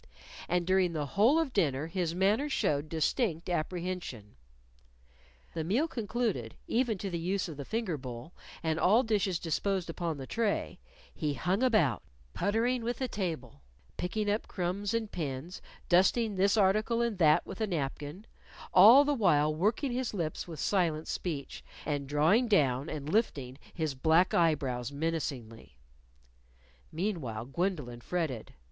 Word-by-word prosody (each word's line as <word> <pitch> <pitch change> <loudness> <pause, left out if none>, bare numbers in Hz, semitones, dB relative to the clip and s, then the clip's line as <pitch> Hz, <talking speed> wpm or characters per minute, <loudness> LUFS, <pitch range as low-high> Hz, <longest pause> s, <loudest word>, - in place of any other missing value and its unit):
And 175 0 +1
during 185 -1 +2
the 150 -2 -2
whole 215 - +3
of 325 -3 +1
the - - -23
dinner 150 -7 +1
his 170 0 -2
manner 210 +10 +2
showed 150 - 0
distinct 165 - 0
apprehension. 175 - -4 1.2
The 160 - -2
meal 230 - +1
concluded, 220 - -2
even 235 -3 0
to 195 0 -4
the 170 - -2
use 185 +3 -1
of 160 - -7
the 140 -1 -7
finger 220 - -2
bowl, 125 +4 -8 0.3
and 160 0 0
all 220 +9 +4
dishes 205 -6 +1
disposed 175 +2 -1
upon 165 -2 -3
the 135 - -6
tray, 225 - -1 0.3
he 150 -3 -2
hung 185 - 0
about, 215 - +3 0.3
puttering 230 +4 0
with 240 +1 -2
the 260 - -2
table, 160 - -4 0.3
picking 210 +4 -2
up 210 +2 0
crumbs 190 +4 -2
and 225 -2 -2
pins, 155 +1 -5 0.3
dusting 200 +4 +3
this 200 +3 +3
article 215 +4 +2
and 230 -5 -2
that 155 -3 +5
with - - -8
a 220 - +1
napkin, 150 +2 -4 0.5
all 270 +6 +9
the 290 - +2
while 155 - +3
working 215 - 0
his 245 -3 -2
lips 165 -3 -3
with 160 -4 -8
silent 165 -5 0
speech, 150 -6 -4 0.2
and 145 -3 -2
drawing 160 +12 +3
down 140 - +2
and 145 -2 -5
lifting 145 - 0 0.2
his 155 -4 -2
black 160 +7 +3
eye 165 -2 +4
brows 125 -3 -4
menacingly. 140 - -4 1.1
Meanwhile, 155 - -3
Gwendolyn 140 -5 -3
fretted. 155 -8 -3
175 Hz, 150 wpm, -30 LUFS, 150-210 Hz, 1.2 s, all